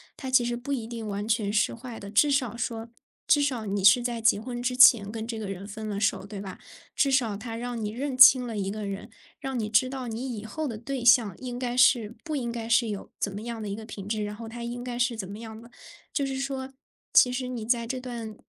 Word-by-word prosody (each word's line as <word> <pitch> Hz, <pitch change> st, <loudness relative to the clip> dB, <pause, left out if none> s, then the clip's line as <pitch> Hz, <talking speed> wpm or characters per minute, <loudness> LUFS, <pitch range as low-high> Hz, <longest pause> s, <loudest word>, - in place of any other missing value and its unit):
它 265 Hz, -, -6 dB
其 255 Hz, -2 st, +4 dB
实 240 Hz, 0 st, -1 dB
不 245 Hz, +4 st, -6 dB
一 250 Hz, -5 st, -1 dB
定 230 Hz, -1 st, -6 dB
完 205 Hz, +1 st, -3 dB
全 215 Hz, -2 st, +1 dB
是 210 Hz, -, +2 dB
坏 235 Hz, 0 st, -8 dB
的。 200 Hz, 0 st, -9 dB
至 255 Hz, +8 st, +4 dB
少 255 Hz, -5 st, 0 dB
说 230 Hz, 0 st, -4 dB, 0.4 s
至 290 Hz, -, +5 dB
少 255 Hz, -6 st, -1 dB
你 200 Hz, -1 st, -2 dB
是 205 Hz, +5 st, +7 dB
在 240 Hz, -1 st, -2 dB
结 220 Hz, -2 st, +4 dB
婚 240 Hz, +2 st, -5 dB
之 250 Hz, +1 st, -1 dB
前 230 Hz, -5 st, +7 dB
跟 220 Hz, 0 st, -5 dB
这 225 Hz, -1 st, -5 dB
个 210 Hz, -, -5 dB
人 195 Hz, 0 st, -6 dB
分 215 Hz, +1 st, -7 dB
了 200 Hz, -1 st, -3 dB
手， 200 Hz, -1 st, 0 dB
对 200 Hz, 0 st, -8 dB
吧？ 190 Hz, -2 st, -8 dB, 0.4 s
至 280 Hz, -, +3 dB
少 240 Hz, -6 st, +2 dB
他 225 Hz, +2 st, -6 dB
让 240 Hz, -1 st, -4 dB
你 210 Hz, -, -2 dB
认 260 Hz, +3 st, -4 dB
清 255 Hz, -1 st, +9 dB
了 230 Hz, -3 st, -5 dB
一 195 Hz, -1 st, -2 dB
个 210 Hz, +1 st, -4 dB
人， 200 Hz, +3 st, -6 dB, 0.3 s
让 270 Hz, -1 st, -4 dB
你 215 Hz, -1 st, -2 dB
知 225 Hz, +4 st, +3 dB
道 260 Hz, -2 st, -5 dB
你 235 Hz, +1 st, -4 dB
以 205 Hz, -, -7 dB
后 310 Hz, +7 st, -4 dB
的 230 Hz, -5 st, -5 dB
对 255 Hz, +2 st, -5 dB
象， 235 Hz, -6 st, +5 dB
应 250 Hz, -1 st, -5 dB
该 245 Hz, -1 st, -3 dB
是 235 Hz, -3 st, +4 dB
不 315 Hz, -3 st, -3 dB
应 240 Hz, -4 st, -2 dB
该 230 Hz, -1 st, -5 dB
是 235 Hz, 0 st, +3 dB
有 205 Hz, -2 st, -6 dB
怎 200 Hz, -, -1 dB
么 205 Hz, +2 st, -6 dB
样 235 Hz, -1 st, -5 dB
的 210 Hz, -, -4 dB
一 200 Hz, -, -3 dB
个 220 Hz, +1 st, -8 dB
品 200 Hz, -3 st, -8 dB
质， 215 Hz, 0 st, -1 dB
然 205 Hz, 0 st, -4 dB
后 225 Hz, +1 st, -8 dB
他 235 Hz, +1 st, -7 dB
应 240 Hz, +1 st, -5 dB
该 245 Hz, -1 st, -5 dB
是 245 Hz, -1 st, +1 dB
怎 190 Hz, -4 st, -5 dB
么 205 Hz, -, -8 dB
样 220 Hz, -1 st, -9 dB
的。 235 Hz, +1 st, -15 dB, 0.4 s
就 280 Hz, -, 0 dB
是 265 Hz, 0 st, -3 dB
说， 270 Hz, -1 st, -4 dB, 0.4 s
其 250 Hz, -, +7 dB
实 250 Hz, 0 st, -3 dB
你 240 Hz, -3 st, -5 dB
在 235 Hz, 0 st, +1 dB
这 260 Hz, +2 st, -3 dB
段 235 Hz, -4 st, -6 dB
235 Hz, 285 characters per minute, -27 LUFS, 215-250 Hz, 0.4 s, 清